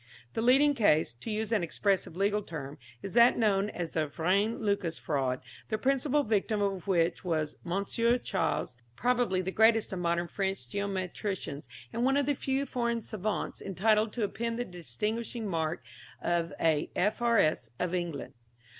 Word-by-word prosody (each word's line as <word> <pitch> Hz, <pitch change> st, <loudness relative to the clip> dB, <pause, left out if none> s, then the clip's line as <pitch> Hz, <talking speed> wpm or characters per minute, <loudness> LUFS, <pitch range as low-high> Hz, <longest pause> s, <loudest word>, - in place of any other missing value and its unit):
The -, -, -1 dB
leading 270 Hz, +5 st, +5 dB
case 160 Hz, -, +3 dB
to 120 Hz, -, -9 dB
use 215 Hz, 0 st, -2 dB
an 225 Hz, -, +3 dB
expressive 185 Hz, 0 st, 0 dB
legal 205 Hz, +2 st, +1 dB
term 150 Hz, -5 st, -7 dB, 0.2 s
is 195 Hz, -, -5 dB
that 235 Hz, +1 st, +6 dB
known 205 Hz, -3 st, +2 dB
as 170 Hz, -5 st, -4 dB
the 155 Hz, -2 st, 0 dB
Vrain 195 Hz, +9 st, +1 dB
Lucas 200 Hz, -6 st, 0 dB
fraud, 130 Hz, -4 st, -1 dB, 0.3 s
the 215 Hz, -, 0 dB
principal 275 Hz, +4 st, +2 dB
victim 215 Hz, -1 st, +1 dB
of 195 Hz, -2 st, -1 dB
which 170 Hz, -2 st, +1 dB
was 155 Hz, -4 st, -1 dB
Mons. 195 Hz, +3 st, -2 dB
Chasles, 225 Hz, -, 0 dB, 0.2 s
probably 245 Hz, -7 st, +1 dB
the 190 Hz, -, -2 dB
greatest 220 Hz, 0 st, +4 dB
of 185 Hz, -, -3 dB
modern 170 Hz, 0 st, 0 dB
French 190 Hz, -8 st, -3 dB
geometricians, 190 Hz, -, -3 dB, 0.2 s
and 230 Hz, +2 st, -1 dB
one 270 Hz, +2 st, +3 dB
of 285 Hz, -, +2 dB
the 290 Hz, -, +2 dB
few 270 Hz, 0 st, -1 dB
foreign 235 Hz, -3 st, -1 dB
savants 215 Hz, 0 st, -3 dB
entitled 215 Hz, +3 st, +2 dB
to 235 Hz, -, -1 dB
append 230 Hz, +3 st, -2 dB
the 245 Hz, -, -2 dB
distinguishing 210 Hz, -, -4 dB
mark 165 Hz, -4 st, -1 dB, 0.4 s
of 170 Hz, -2 st, 0 dB
a 155 Hz, -2 st, +2 dB
F.R.S. 210 Hz, -, +2 dB
of 180 Hz, -1 st, -2 dB
England. 175 Hz, -5 st, -3 dB
200 Hz, 160 wpm, -30 LUFS, 170-230 Hz, 0.4 s, that